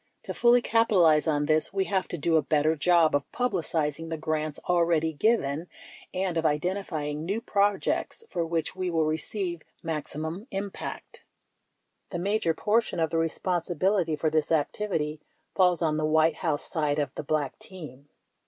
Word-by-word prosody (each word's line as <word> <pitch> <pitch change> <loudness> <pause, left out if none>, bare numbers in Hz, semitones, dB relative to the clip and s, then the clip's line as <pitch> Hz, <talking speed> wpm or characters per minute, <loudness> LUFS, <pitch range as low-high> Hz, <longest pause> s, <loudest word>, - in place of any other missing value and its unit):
To - - -5
fully 240 0 +4
capitalize 180 -9 +4
on 145 -2 +1
this, 155 +1 +2
we 195 -1 0
have 190 -2 0
to 175 - -5
do 165 +2 +1
a 160 - +5
better 155 +1 +2
job 165 +1 +4
of 145 -1 -1
publicizing 165 - -1
the 165 - -3
grants 155 -1 -2
already 170 -2 +2
given 160 -4 +1 0.4
and 185 -2 -1
of 165 - +1
identifying 155 -2 -1
new 200 +6 -1
projects 205 - 0
for 170 - -2
which 165 +1 -2
we 185 -1 -2
will 165 -2 +1
receive 170 +2 -2 0.2
maximum 160 - -4
impact. 195 -1 -6 0.9
The 175 - -4
major 180 -2 0
portion 215 -4 +1
of 160 -1 +1
the 165 - +1
responsibility 175 +1 0
for 155 +1 0
this 155 0 +1
activity 155 -1 -1 0.3
falls 180 -2 +3
on 155 -1 +1
the 155 - 0
White 155 0 +3
House 155 -5 -1
side 150 -2 0
of 145 -3 -1
the - - -4
Black 145 -2 -2
team. 145 -7 -10
165 Hz, 160 wpm, -27 LUFS, 155-185 Hz, 0.9 s, a